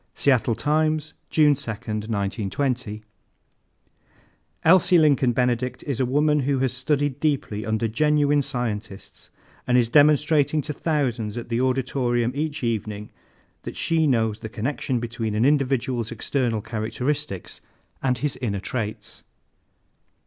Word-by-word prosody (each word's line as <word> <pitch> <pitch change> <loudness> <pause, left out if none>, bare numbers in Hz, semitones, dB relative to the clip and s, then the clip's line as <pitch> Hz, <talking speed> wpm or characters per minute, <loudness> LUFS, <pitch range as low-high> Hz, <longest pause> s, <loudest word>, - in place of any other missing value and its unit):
Seattle 125 -4 +2
Times, 155 +2 0 0.2
June 150 -2 +5
2, 140 -4 -5
1920. 110 +2 -3 1.6
"Elsie 180 +1 +6
Lincoln 140 -5 +4
Benedict 125 0 -1
is 140 -5 -3
a 130 - +1
woman 150 +3 +2
who 140 0 0
has 130 -1 0
studied 140 +1 -1
deeply 140 -9 -1
under 110 +1 0
genuine 145 +4 +2
scientists 115 -7 -5 0.4
and 125 0 +4
is 120 -2 +2
demonstrating 150 +2 +4
to 150 - -4
thousands 125 -9 -1
at 120 - -6
the 115 +1 0
Auditorium 125 -2 0
each 150 0 -3
evening 105 -2 -3 0.5
that - - -7
she 160 -2 +1
knows 110 -5 +1
the 110 - -7
connection 125 +2 -2
between 115 -2 -3
an 110 +3 +2
individual's 130 -5 +1
external 120 -1 -1
characteristics 115 +1 -3 0.4
and 125 -2 +1
his 145 +2 -2
inner 100 -5 -1
traits." 110 0 -5
125 Hz, 125 wpm, -24 LUFS, 115-145 Hz, 1.6 s, Elsie